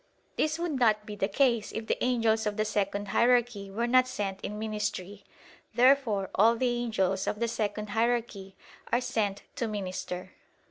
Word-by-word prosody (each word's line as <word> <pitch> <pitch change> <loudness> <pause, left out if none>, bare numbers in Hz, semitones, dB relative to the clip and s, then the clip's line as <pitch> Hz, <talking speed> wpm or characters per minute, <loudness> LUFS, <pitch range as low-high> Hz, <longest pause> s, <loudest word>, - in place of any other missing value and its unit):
This 310 +1 0
would 335 -5 -2
not 215 -3 +3
be 210 - -7
the 195 -1 0
case 235 0 +1
if 220 - -5
the - - -1
angels 225 -3 +2
of 210 0 -2
the 215 - +1
second 205 -1 -1
hierarchy 240 -3 +2
were 225 +5 -1
not 255 +1 +4
sent 200 -6 -4
in 210 - -5
ministry. 210 -2 -4 0.5
Therefore 245 -6 +3
all 225 +4 +5
the 250 +2 +1
angels 195 -5 0
of 210 - -2
the 235 - +1
second 210 -2 -3
hierarchy 225 -4 -1 0.4
are 240 - +3
sent 215 -6 -2
to 235 - -1
minister. 185 -3 -5
215 Hz, 170 wpm, -29 LUFS, 200-240 Hz, 0.5 s, all